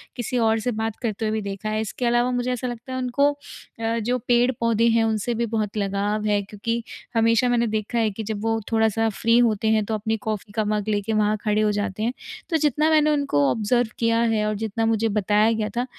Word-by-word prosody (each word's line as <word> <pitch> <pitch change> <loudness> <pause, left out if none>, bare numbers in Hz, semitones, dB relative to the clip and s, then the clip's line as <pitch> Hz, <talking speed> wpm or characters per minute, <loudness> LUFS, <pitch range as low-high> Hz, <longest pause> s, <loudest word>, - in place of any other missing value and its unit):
किसी 245 0 -3
और 225 -1 +2
से 245 +3 -1
बात 220 -1 -3
करते 225 -2 -2
हुए - - 0
भी 220 - -1
देखा 200 +1 -5
है। 215 0 -1
इसके 220 +3 -4
अलावा 240 +1 +2
मुझे 245 0 -1
ऐसा 250 +1 -3
लगता 240 +1 -7
है - - -2
उनको 255 +3 +2 0.5
अ, 225 0 -1
जो 245 +3 0
पेड़-पौधे 235 -2 +2
हैं 225 - +3
उनसे 220 +1 0
भी 235 +1 0
बहुत 215 -1 -2
लगाव 205 +1 -1
है। 205 -1 +2
क्योंकि 220 +4 -4 0.3
हमेशा 230 +2 +3
मैंने 235 -1 +2
देखा 215 +2 -2
है 220 -2 +1
कि 220 +3 -6
जब 210 -1 -4
वो 225 0 +1
थोड़ा-सा 225 0 +2
फ्री 230 +1 +4
होते 220 -3 +2
हैं 215 - 0
तो 220 - -3
अपनी 220 +1 -1
कॉफ़ी 215 -1 -3
का 215 -1 0
मग 210 0 -1
लेकर 205 +1 -1
वहाँ 215 0 +2
खड़े 210 0 +1
हो 210 -1 +2
जाते 205 0 -2
हैं। 235 +2 0 0.4
तो 325 - +2
जितना 300 +1 +2
मैंने 305 -1 +4
उनको 275 - +2
ऑब्ज़र्व 230 +2 +1
किया 230 0 +2 0.2
है 210 -1 +1
और 215 - -1
जितना 220 +1 -2
मुझे 225 0 +1
बताया 210 +1 +2
गया 220 -1 -1
था, 245 - +1
225 Hz, 230 wpm, -23 LUFS, 210-240 Hz, 0.5 s, फ्री